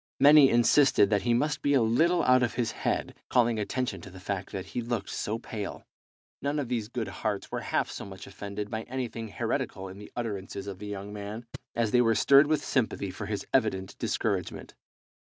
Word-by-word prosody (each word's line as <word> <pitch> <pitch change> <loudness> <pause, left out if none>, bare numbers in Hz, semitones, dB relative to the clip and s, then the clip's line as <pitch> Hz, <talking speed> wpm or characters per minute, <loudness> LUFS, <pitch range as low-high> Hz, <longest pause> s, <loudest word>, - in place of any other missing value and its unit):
Many 145 -1 +8
insisted 120 -2 +5
that 105 -2 +3
he 120 - +1
must 145 +5 0
be 145 0 +2
a 130 - +5
little 165 +11 +3
out 125 0 +5
of 120 -1 0
his 120 -1 0
head, - - -2 0.2
calling 120 -3 +3
attention 105 -3 -2
to 95 - -10
the 95 0 -11
fact 95 0 -4
that 95 -1 -4
he 120 - -1
looked 120 0 -3
so 110 +2 -2
pale. 110 -3 -6 0.6
None 140 +2 -1
of 140 -5 -2
these 115 -4 -1
good 120 -1 -3
hearts 100 +1 -3
were - - -2
half - - 0
so - - -6
much 95 -2 -9
offended 100 +1 -6
by 110 - -2
anything 120 -3 -4
heretical 95 -2 -3
in 95 +2 -10
the 105 - -11
utterances 100 -4 -4
of 100 -2 -7
the 105 - -7
young 100 0 -6
man 105 +3 -6 0.3
as 115 -2 +1
they 125 - +5
were 115 -2 +3
stirred 140 +5 +6
with 150 -1 0
sympathy 110 -6 0
for - - -6
his - - -3
evident 95 0 +1
discouragement. - - -2
115 Hz, 205 wpm, -28 LUFS, 100-125 Hz, 0.6 s, Many